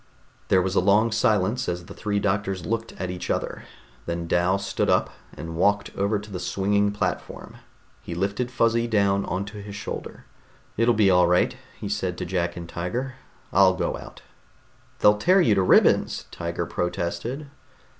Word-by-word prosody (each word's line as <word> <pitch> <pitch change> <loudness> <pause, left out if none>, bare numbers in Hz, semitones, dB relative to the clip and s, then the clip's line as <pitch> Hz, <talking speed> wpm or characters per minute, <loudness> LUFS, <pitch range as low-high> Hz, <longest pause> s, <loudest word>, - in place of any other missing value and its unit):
There 95 -1 +4
was 95 0 -1
a - - +3
long 105 +5 +3
silence 110 0 +1
as 90 0 -4
the - - -10
three 105 -1 -2
doctors 95 -2 -1
looked 115 0 -2
at 90 -1 -4
each 90 - -6
other. - - -2 0.4
Then 85 0 -3
Dal 90 +3 +2
stood 100 - -1
up - - +2 0.3
and 80 0 -6
walked 100 +4 +1
over 100 +2 +1
to 105 +1 -9
the 90 - -4
swinging 100 +3 +1
platform. 105 +1 -4 0.4
He 85 - -6
lifted 100 +7 -1
Fuzzy 115 -1 +1
down 100 -3 +2
onto 100 +3 -4
his 100 0 -8
shoulder. 105 - -7 0.5
"It'll 115 +1 +3
be 105 -3 +4
all 90 -1 +5
right," 90 +1 +2 0.2
he - - -5
said 95 -3 -2
to - - -4
Jack 85 -1 -2
and 85 -1 -7
Tiger. 120 +11 -3 0.4
"I'll 95 0 +5
go - - -1
out." - - -11 0.8
"They'll 105 0 +5
tear 185 - +4
you 115 - +4
to 95 - +2
ribbons!" 90 - +3
Tiger - - -3
protested. 90 - -3
100 Hz, 170 wpm, -25 LUFS, 90-105 Hz, 0.8 s, all